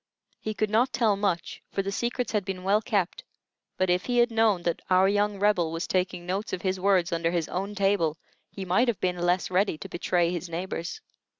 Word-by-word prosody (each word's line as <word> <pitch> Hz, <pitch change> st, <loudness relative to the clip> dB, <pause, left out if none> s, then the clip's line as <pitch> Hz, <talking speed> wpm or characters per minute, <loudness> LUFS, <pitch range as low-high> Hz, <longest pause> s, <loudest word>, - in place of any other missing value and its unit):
He 215 Hz, 0 st, -4 dB
could 215 Hz, -1 st, -1 dB
not 240 Hz, +4 st, +3 dB
tell 220 Hz, -4 st, +2 dB
much, 195 Hz, -4 st, -2 dB
for 195 Hz, -, -2 dB
the 195 Hz, -, -3 dB
secrets 240 Hz, +3 st, -2 dB
had 210 Hz, -2 st, 0 dB
been 185 Hz, -1 st, -5 dB
well 200 Hz, +3 st, +3 dB
kept; 200 Hz, -6 st, -1 dB, 0.5 s
but 185 Hz, -, +2 dB
if 180 Hz, +1 st, +1 dB
he 245 Hz, -1 st, 0 dB
had 240 Hz, 0 st, +4 dB
known 220 Hz, -5 st, +2 dB
that 170 Hz, -1 st, -1 dB
our 185 Hz, +1 st, +5 dB
young 205 Hz, 0 st, +1 dB
Rebel 190 Hz, -5 st, +2 dB
was 165 Hz, +1 st, -3 dB
taking 180 Hz, -1 st, -1 dB
notes 195 Hz, +5 st, -3 dB
of 180 Hz, -, -3 dB
his 190 Hz, -1 st, 0 dB
words 185 Hz, -3 st, +2 dB
under 165 Hz, 0 st, 0 dB
his 170 Hz, -2 st, -1 dB
own 195 Hz, +3 st, -3 dB
table, 195 Hz, -6 st, +1 dB, 0.3 s
he 195 Hz, -, -7 dB
might 190 Hz, +8 st, +3 dB
have 235 Hz, -4 st, 0 dB
been 180 Hz, -1 st, -1 dB
less 175 Hz, +1 st, +1 dB
ready 185 Hz, -2 st, +2 dB
to -, -, -8 dB
betray 175 Hz, 0 st, 0 dB
his 175 Hz, 0 st, -4 dB
neighbors. 170 Hz, -, -4 dB
190 Hz, 215 wpm, -27 LUFS, 175-210 Hz, 0.5 s, our